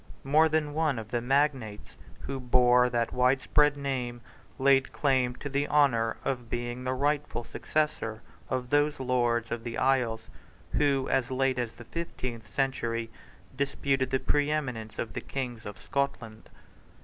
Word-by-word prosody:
More 155 +4 +4
than 155 -1 0
one 155 -4 +1
of 110 -1 -6
the 120 - 0
magnates 130 -5 0 0.3
who 135 -1 -4
bore 125 0 +4
that 120 -1 -1
widespread 135 +3 +3
name 125 -4 -3 0.4
laid 135 0 +4
claim 130 -3 +1
to 145 - -6
the 140 +1 0
honour 120 -6 +3
of 125 -3 -2
being 120 +1 -3
the 130 0 -1
rightful 145 -2 0
successor 115 -7 -2 0.3
of 125 -1 -2
those 145 0 +2
Lords 120 -3 +1
of 115 -1 -3
the 115 -1 -4
Isles, 125 -4 +1 0.4
who, 140 -2 +2
as 130 -2 +1
late 130 -1 +1
as 120 -2 -2
the 120 - -12
fifteenth 130 -7 -5
century, 115 -4 -1 0.4
disputed 140 -1 0
the 130 - +1
preeminence 145 -8 -1
of 115 - -4
the - - -4
Kings 125 -5 -5
of 105 - -7
Scotland. 125 -6 -3
130 Hz, 150 wpm, -29 LUFS, 120-140 Hz, 0.4 s, More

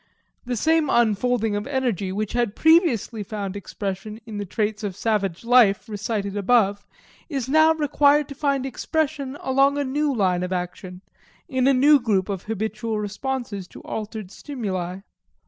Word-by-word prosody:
The 245 0 -2
same 320 +3 +2
unfolding 225 -1 +2
of 205 +3 -3
energy, 245 -9 -1
which 210 +2 -3
had 240 -4 0
previously 320 - +3
found 200 -1 -5
expression 205 +1 -5
in 215 -3 -6
the 205 - -4
traits 210 +2 -2
of 200 -3 -3
savage 200 -3 -1
life 235 -4 +4
recited 205 -1 -3
above, 205 -1 +2 0.4
is 270 -5 -3
now 315 +3 +5
required 295 -1 +3
to - - -6
find 280 -2 0
expression 280 0 -2
along 275 +2 +3
a 285 - +1
new 290 +2 0
line 185 -7 +1
of 180 0 -3
action, 180 +1 -5 0.4
in 260 0 +1
a 275 - +5
new 285 +3 +6
group 210 -5 0
of 195 -2 -4
habitual 220 +1 -3
responses 210 -2 -4
to - - -13
altered 215 -3 -6
stimuli. 195 - -4
220 Hz, 155 wpm, -23 LUFS, 200-270 Hz, 0.4 s, new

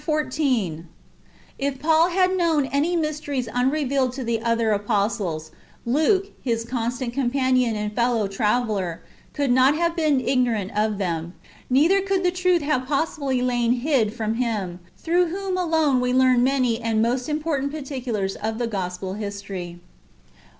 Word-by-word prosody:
XIV. 260 - -1 0.4
— - - -30
If 275 -1 -1
Paul 320 +3 +3
had 370 +1 +2
knoiun 330 -6 +1
any 300 +5 +1
mysteries 300 -5 -2
iinrevealed 265 0 0
to 265 - -4
the 230 -1 -1
other 230 -2 +1
ajjostlesj 200 -6 -1 0.3
Liike, 315 - +2
his 230 -3 -1
constant 240 +1 -3
companion 255 -2 +1
and 210 0 -3
feUoiv 230 -4 0
traveUery 210 -6 0 0.4
could 285 -3 0
not 260 +3 +5
have 335 +1 0
been 305 -5 +2
ignorant 245 -6 0
of 210 0 +1
them; 170 -3 -3 0.3
neither 320 +10 +4
coidd 390 -1 0
the 360 - +3
truth 360 -2 +1
have 260 -3 0
possibly 275 -3 -1
lain 240 -1 +2
hid 250 -4 +1
from 220 -1 -2
him, 215 -7 -2 0.2
through 350 +2 +1
ivhom 385 +3 -4
alone 320 -7 +2
ive 250 0 +1
learn 255 -1 +4
many 255 -3 +1
and 225 -1 +1
most 250 +4 -1
important 300 -2 -1
particulars 255 -9 -3
of 220 +1 -3
the 240 - -1
gospel 190 -3 -4
history. 200 -4 -6
250 Hz, 150 wpm, -23 LUFS, 220-300 Hz, 0.4 s, not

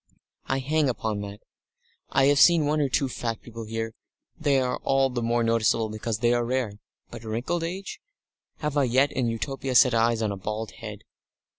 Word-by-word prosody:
I 135 - 0
hang 145 +2 +1
upon 110 -4 -2
that. 100 0 -8 0.7
I 135 - +3
have 140 0 +4
seen 170 -2 +6
one 150 +1 +1
or 140 - +1
two 135 +2 +1
fat 115 -2 -3
people 115 -1 -8
here 115 0 -4 0.4
they 145 -4 +2
are 125 -1 0
all 135 -1 +1
the 125 -1 -2
more 120 0 +1
noticeable 115 -1 +2
because 110 0 -3
they 120 +2 +2
are 120 0 +1
rare. 120 -4 -2 0.3
But - - -9
wrinkled 120 +10 -2
age? 185 +4 -5 0.6
Have 150 -1 -1
I 140 - +4
yet 130 +4 +3
in 125 -2 -1
Utopia 130 +3 -3
set 125 0 +6
eyes 115 0 +2
on 105 - 0
a 100 - -4
bald 105 +3 -4
head? - - -9
120 Hz, 190 wpm, -26 LUFS, 115-135 Hz, 0.7 s, seen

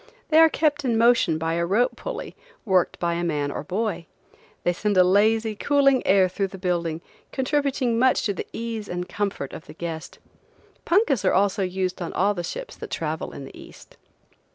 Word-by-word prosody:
They 315 0 +5
are 325 0 +8
kept 295 -2 +1
in 235 -4 +1
motion 230 -8 +4
by 165 +1 -1
a 170 +1 0
rope 205 +8 +1
pulley, - - -6 0.3
worked 190 -4 +2
by 170 -1 0
a 170 +1 -2
man 145 -4 -1
or - - -4
boy. 180 -1 -3 0.6
They 175 - +2
send 205 +2 -1
a 185 - +8
lazy, 215 +4 +3
cooling 275 +2 +3
air 190 -1 +5
through 195 +2 -2
the 190 - -10
building, 170 -3 -2 0.3
contributing 265 -3 0
much 260 +1 +3
to 205 - 0
the - - -6
ease 225 -2 -5
and 180 0 -4
comfort 200 -9 -3
of - - -9
the 150 - -11
guest. 165 -2 -6 0.7
Punkas 340 - +2
are 185 - +3
also 200 +1 +2
used 185 0 -2
on 170 - -4
all 200 +3 +2
the 175 - -4
ships - - -6
that 450 - -8
travel 160 -1 -3
in 140 - -8
the - - -12
East. - - -14
195 Hz, 195 wpm, -24 LUFS, 175-245 Hz, 0.7 s, are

